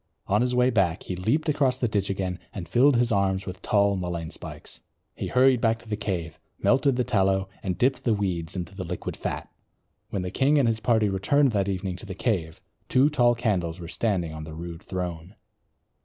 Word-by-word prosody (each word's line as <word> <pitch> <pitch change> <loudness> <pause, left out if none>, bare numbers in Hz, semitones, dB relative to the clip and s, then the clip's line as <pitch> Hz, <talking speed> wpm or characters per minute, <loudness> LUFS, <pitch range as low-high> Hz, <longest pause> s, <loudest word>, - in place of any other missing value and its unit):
On 105 +3 +2
his 125 0 +1
way 125 +1 +4
back 95 -7 +1
he 90 - -4
leaped 115 - 0
across 140 -4 +2
the 125 - 0
ditch 100 -3 -1
again 95 -2 -2 0.2
and 90 -5 -5
filled 130 - +4
his 120 0 +2
arms 95 -2 +1
with 95 +1 -7
tall 100 -1 +3
mullein 85 -3 -4
spikes. - - -9 0.3
He - - -4
hurried 130 -1 +4
back 115 -1 +3
to 115 - -18
the 105 - -1
cave, 85 -6 -4 0.2
melted 135 -1 +3
the 125 - +1
tallow, 95 -3 +1
and 90 -3 -2
dipped 130 +4 +1
the 115 -3 +2
weeds 90 -5 -2
into 90 -1 -5
the 95 -1 -5
liquid 90 0 -5
fat. - - -4 0.6
When 95 - -2
the 90 - -4
king 140 +3 +3
and 135 -4 +4
his 115 -1 +1
party 110 -2 +2
returned 130 +8 +2
that 100 -2 0
evening 95 -1 -3
to 105 - -10
the 95 - -6
cave, 90 -7 -1 0.3
two 135 +3 +4
tall 120 -4 +4
candles 90 -7 -1
were 85 - -7
standing 90 -4 -1
on 80 0 -6
the 80 0 -8
rude 85 0 -7
throne. 90 0 -5
100 Hz, 210 wpm, -26 LUFS, 90-120 Hz, 0.6 s, way